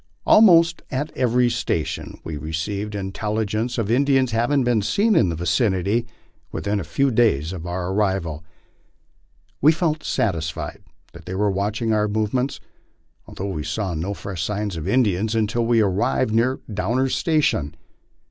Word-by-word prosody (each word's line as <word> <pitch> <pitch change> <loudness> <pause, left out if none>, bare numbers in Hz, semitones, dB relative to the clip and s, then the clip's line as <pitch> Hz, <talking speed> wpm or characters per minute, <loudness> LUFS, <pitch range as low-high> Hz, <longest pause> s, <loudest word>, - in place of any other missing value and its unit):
Almost 170 -6 +6
at 145 +3 -3
every 125 -1 +2
station - - -3
we 80 - -5
received 100 +8 -4
intelligence 105 +4 -2
of 115 -2 -1
In 130 +4 +4
dians 135 -3 +2
having 120 +5 +1
been 120 -3 +2
seen 210 - +2
in 90 - +4
the 85 - -2
vicinity 95 +6 0 0.4
within 100 0 -2
a - - -3
few 140 -1 0
days 95 - +2
of 90 -2 -6
our 90 +1 -3
arrival. 95 -6 -1 1.2
We 150 - +7
felt 160 -1 -1
satisfied 80 -6 -2 0.4
they 90 - -5
were 105 +1 +1
watching 105 +3 -1
our 105 0 +2
movements, 110 +5 -1 0.7
although 100 +1 -5
we 75 - -3
saw 90 +4 -2
no 90 +6 -3
fresh 95 -4 -6
signs 105 +2 -2
of 80 -2 -5
Indians 110 -3 +1
until 115 +1 0
we 115 -1 +4
arrived 105 +4 +1
near 120 +4 +2
Downer's 120 +7 0
station. 145 - +1
105 Hz, 150 wpm, -22 LUFS, 95-125 Hz, 1.2 s, We